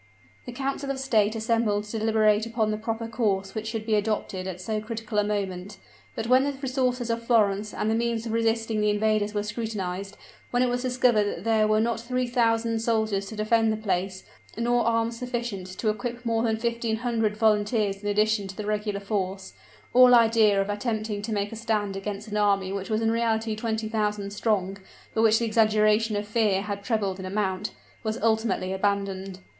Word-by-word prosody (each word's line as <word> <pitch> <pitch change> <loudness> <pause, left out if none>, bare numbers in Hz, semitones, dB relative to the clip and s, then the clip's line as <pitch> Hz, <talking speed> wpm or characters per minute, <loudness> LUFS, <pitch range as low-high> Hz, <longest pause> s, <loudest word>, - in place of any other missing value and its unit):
The - - -4
council 275 +2 -3
of 275 - -1
state 220 -5 +2
assembled 220 -2 +1
to 210 +1 -5
deliberate 215 0 +3
upon 225 -2 0
the 215 - -1
proper 225 +1 -3
course 205 -4 -1
which 220 -1 -4
should 220 -1 -4
be 220 - 0
adopted 205 -3 -1
at 185 -1 -5
so 215 +3 -2
critical 220 -1 -3
a - - +3
moment; 200 -1 -3 0.4
but 220 - -3
when 255 +2 +5
the 285 0 -1
resources 255 -3 -1
of 230 0 -2
Florence 210 -3 +2
and - - -2
the 220 - +2
means 230 0 -1
of 225 - -3
resisting 225 -1 0
the 210 - +2
invaders 210 0 +1
were 205 - 0
scrutinized, 205 -3 -4 0.3
when 245 +1 +2
it 250 - +2
was 245 0 -1
discovered 250 -4 +2
that 185 -3 -4
there 220 -1 +3
were 215 0 +3
not 230 +1 0
three 250 +2 -1
thousand 230 -2 +1
soldiers 220 -3 0
to 220 - -7
defend 220 +1 +2
the 215 - -1
place, 190 -2 -2 0.3
nor 240 0 +1
arms 230 0 0
sufficient 240 -6 -4
to 190 +4 -2
equip 240 +3 -4
more 225 -1 +1
than 225 -1 +1
fifteen 235 -1 -1
hundred 225 -3 -1
volunteers 210 -2 +1
in 205 - -2
addition 210 0 +2
to 190 - -8
the 210 - -4
regular 210 -1 -1
force, 195 -2 -3 0.4
all 250 0 +8
idea 225 -3 +5
of 195 - 0
attempting 215 -1 -2
to 215 +2 -5
make 205 -1 -1
a - - -6
stand 215 -3 -1
against 200 +2 -5
an 210 0 -3
army 195 -2 +2
which 195 +1 -4
was 215 0 0
in 225 0 +2
reality 225 -1 0
twenty 220 0 -2
thousand 210 -2 -1
strong, 205 -2 -1 0.3
but 220 - +1
which 220 -1 +5
the 235 - 0
exaggerations 215 -1 +3
of 205 0 -4
fear 210 -3 +1
had 200 -1 -5
trebled 200 -5 -1
in 190 - -6
amount, 195 0 -1 0.3
was 220 0 -2
ultimately 220 -4 +1
abandoned. 195 -1 -2
215 Hz, 195 wpm, -26 LUFS, 205-230 Hz, 0.4 s, all